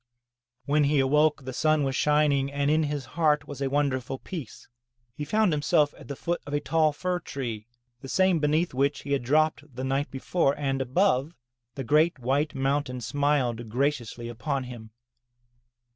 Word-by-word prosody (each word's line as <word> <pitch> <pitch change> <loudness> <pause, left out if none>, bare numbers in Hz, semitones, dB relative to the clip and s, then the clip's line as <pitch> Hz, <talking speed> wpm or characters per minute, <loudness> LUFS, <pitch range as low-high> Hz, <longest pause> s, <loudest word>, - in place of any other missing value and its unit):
When 145 +1 +3
he 145 +1 +2
awoke 150 +1 +2
the 130 - -5
sun 155 +2 +2
was 135 -1 -1
shining 145 -2 +2
and 140 +1 0
in 155 +1 +3
his 145 -2 -3
heart 150 -3 +1
was 140 -1 -8
a 135 - 0
wonderful 135 -2 -1
peace. 150 - -8 0.5
He 150 - -5
found 215 +2 +2
himself 150 0 +2
at - - -14
the 140 - -5
foot 170 +5 -2
of 145 - -2
a - - +2
tall 155 +1 +2
fir 180 +4 -2
tree, 120 -9 -5 0.3
the 135 - -9
same 185 +1 +3
beneath 155 +3 +1
which 140 +2 0
he 140 - -7
had 140 -2 +1
dropped 150 +1 +1
the 130 - -4
night 135 +2 -1
before, 135 +2 0
and, 135 -2 -1
above, 140 +2 +1 0.4
the 135 - -4
great 155 +7 +3
white 140 +4 0
mountain 135 -1 -1
smiled 125 -3 0
graciously 120 -2 -1
upon 135 +4 -3
him. 120 -3 -9
145 Hz, 175 wpm, -27 LUFS, 130-150 Hz, 0.5 s, When